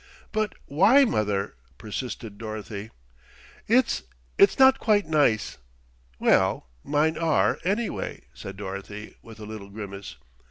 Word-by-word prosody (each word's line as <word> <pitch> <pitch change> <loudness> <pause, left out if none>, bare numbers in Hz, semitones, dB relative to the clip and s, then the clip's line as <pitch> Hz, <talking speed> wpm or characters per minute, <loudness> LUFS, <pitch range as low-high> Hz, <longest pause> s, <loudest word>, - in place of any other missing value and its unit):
"But 215 -1 -1
why, 210 - +5
mother?" 105 - -1 0.2
persisted 110 -1 -6
Dorothy. 110 -1 -6 0.8
"It's 250 +4 +3 0.3
it's 395 - +5
not 265 0 +6
quite 210 -2 +2
nice." 145 -9 +1 0.6
"Well, - - +2 0.2
mine 155 +2 +1
are, 165 -3 +2
anyway," 210 +5 -2
said 95 0 -9
Dorothy 100 +1 -7
with 110 -1 -13
a 105 - -8
little 105 -2 -8
grimace. 100 -1 -8
115 Hz, 115 wpm, -26 LUFS, -, 0.8 s, not